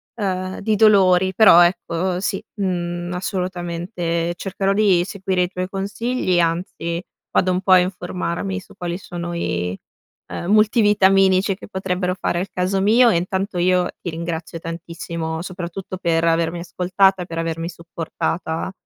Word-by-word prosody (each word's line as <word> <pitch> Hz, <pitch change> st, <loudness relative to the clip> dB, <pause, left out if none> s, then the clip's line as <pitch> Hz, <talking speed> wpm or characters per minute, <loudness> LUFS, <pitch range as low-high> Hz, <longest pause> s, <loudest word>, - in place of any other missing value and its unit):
ehm, 185 Hz, -3 st, -3 dB
di 215 Hz, +1 st, +1 dB
dolori. 190 Hz, -3 st, +5 dB
Però, 185 Hz, -6 st, +8 dB
ecco, 175 Hz, +1 st, +1 dB
sì, 195 Hz, 0 st, -2 dB, 0.2 s
mhmm, 175 Hz, -1 st, -2 dB
assolutamente 175 Hz, -2 st, -2 dB
cercherò 195 Hz, +1 st, -2 dB
di 195 Hz, -4 st, +3 dB
seguire 190 Hz, -1 st, -2 dB
i 180 Hz, -, 0 dB
tuoi 185 Hz, -1 st, -4 dB
consigli, 200 Hz, 0 st, -1 dB
anzi 170 Hz, 0 st, -1 dB, 0.3 s
vado 185 Hz, -, +2 dB
un 180 Hz, +1 st, 0 dB
po' 190 Hz, -, 0 dB
a 185 Hz, -, +8 dB
informarmi 180 Hz, +1 st, -3 dB
su -, -, -16 dB
quali 175 Hz, -1 st, -3 dB
sono 175 Hz, -1 st, -6 dB
i, 90 Hz, -, -2 dB, 0.5 s
ehm, 175 Hz, -, -4 dB
multivitaminici 200 Hz, -3 st, +4 dB
che -, -, -12 dB
potrebbero 185 Hz, -2 st, -2 dB
fare 175 Hz, -, -1 dB
al 190 Hz, +2 st, -3 dB
caso 185 Hz, +2 st, 0 dB
mio 235 Hz, +4 st, +5 dB
e, -, -, +2 dB
intanto, 190 Hz, +2 st, -2 dB
io 180 Hz, 0 st, +3 dB
ti 175 Hz, -, -4 dB
ringrazio 165 Hz, 0 st, -5 dB
tantissimo, 165 Hz, -1 st, -5 dB
soprattutto 185 Hz, 0 st, -6 dB
per 165 Hz, -2 st, +1 dB
avermi 165 Hz, +1 st, +1 dB
ascoltata, 180 Hz, +2 st, +1 dB
per 165 Hz, -1 st, -7 dB
avermi 165 Hz, 0 st, -2 dB
supportata, 165 Hz, 0 st, -4 dB
180 Hz, 145 wpm, -21 LUFS, 170-195 Hz, 0.5 s, Però